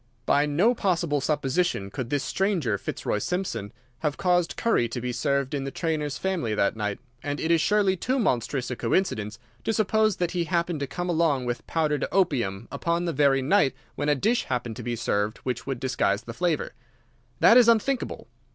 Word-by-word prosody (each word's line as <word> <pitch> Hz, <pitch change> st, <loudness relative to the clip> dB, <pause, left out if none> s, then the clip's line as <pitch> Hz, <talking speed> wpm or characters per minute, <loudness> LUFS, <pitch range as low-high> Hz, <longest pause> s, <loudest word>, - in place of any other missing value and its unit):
By 145 Hz, +1 st, +3 dB
no 180 Hz, +12 st, +3 dB
possible 170 Hz, -, 0 dB
supposition 140 Hz, -, 0 dB
could 120 Hz, +2 st, -4 dB
this 145 Hz, -1 st, 0 dB
stranger, 170 Hz, -, 0 dB
Fitzroy 105 Hz, -, -2 dB
Simpson, 115 Hz, -, -3 dB, 0.3 s
have 150 Hz, -2 st, -1 dB
caused 180 Hz, -2 st, +1 dB
curry 120 Hz, -, +2 dB
to 120 Hz, -, -4 dB
be 125 Hz, +1 st, -3 dB
served 140 Hz, +2 st, 0 dB
in 140 Hz, -2 st, -1 dB
the 135 Hz, -, -3 dB
trainer's 150 Hz, -1 st, -2 dB
family 175 Hz, -, -1 dB
that 100 Hz, -, +1 dB
night, 105 Hz, -2 st, -2 dB, 0.2 s
and 145 Hz, 0 st, -3 dB
it 160 Hz, -, 0 dB
is 165 Hz, -2 st, +4 dB
surely 205 Hz, -1 st, +3 dB
too 255 Hz, +9 st, -1 dB
monstrous 130 Hz, -, 0 dB
a -, -, -2 dB
coincidence 115 Hz, -, -1 dB, 0.3 s
to -, -, 0 dB
suppose 215 Hz, -1 st, +2 dB
that 175 Hz, -1 st, -1 dB
he 175 Hz, -2 st, -1 dB
happened 170 Hz, -1 st, -1 dB
to 140 Hz, -, -2 dB
come 175 Hz, +4 st, -4 dB
along 160 Hz, -6 st, +1 dB
with 120 Hz, -1 st, -4 dB
powdered 155 Hz, -3 st, 0 dB
opium 120 Hz, -, 0 dB
upon 170 Hz, +1 st, -1 dB
the 170 Hz, -, -1 dB
very 135 Hz, -2 st, +3 dB
night 145 Hz, -3 st, +3 dB, 0.2 s
when 145 Hz, 0 st, -2 dB
a 145 Hz, -, +4 dB
dish 225 Hz, -, +1 dB
happened 120 Hz, -3 st, -3 dB
to -, -, -5 dB
be 120 Hz, 0 st, -2 dB
served 105 Hz, -1 st, -1 dB
which 125 Hz, -1 st, -3 dB
would 135 Hz, -3 st, -2 dB
disguise 105 Hz, -6 st, 0 dB
the 115 Hz, -, -7 dB
flavour. 175 Hz, +2 st, -1 dB, 0.7 s
That 230 Hz, -, +7 dB
is 245 Hz, -2 st, +7 dB
unthinkable. 235 Hz, -, +1 dB
150 Hz, 190 wpm, -26 LUFS, 125-180 Hz, 0.7 s, That